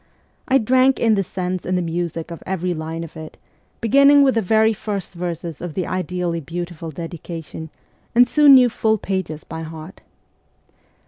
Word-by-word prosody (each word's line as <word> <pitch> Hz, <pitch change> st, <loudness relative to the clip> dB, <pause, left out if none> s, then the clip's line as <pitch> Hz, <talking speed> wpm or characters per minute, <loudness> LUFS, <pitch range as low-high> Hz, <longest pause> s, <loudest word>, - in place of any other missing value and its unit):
I 265 Hz, -, +4 dB
drank 255 Hz, +2 st, +3 dB
in 225 Hz, -2 st, +3 dB
the 195 Hz, -2 st, +1 dB
sense 185 Hz, 0 st, -4 dB
and 185 Hz, 0 st, -1 dB
the -, -, 0 dB
music 170 Hz, 0 st, -4 dB
of 170 Hz, -, -8 dB
every 180 Hz, -1 st, -2 dB
line 160 Hz, +1 st, -5 dB
of 165 Hz, -, -11 dB
it, 160 Hz, -1 st, -9 dB, 0.4 s
beginning 280 Hz, +5 st, +6 dB
with 265 Hz, -2 st, +4 dB
the 225 Hz, -, +1 dB
very 220 Hz, +3 st, +3 dB
first 200 Hz, -3 st, -5 dB
verses 170 Hz, -2 st, -5 dB
of 175 Hz, -3 st, -6 dB
the 185 Hz, -, -1 dB
ideally 180 Hz, -2 st, -2 dB
beautiful 170 Hz, +1 st, -6 dB
dedication, 165 Hz, 0 st, -7 dB, 0.5 s
and 245 Hz, +1 st, +6 dB
soon 295 Hz, -2 st, +7 dB
knew 255 Hz, -1 st, +7 dB
full 220 Hz, -1 st, +1 dB
pages 185 Hz, -6 st, -4 dB
by 160 Hz, -, -7 dB
heart. 160 Hz, +2 st, -9 dB
180 Hz, 170 wpm, -21 LUFS, 165-220 Hz, 0.5 s, soon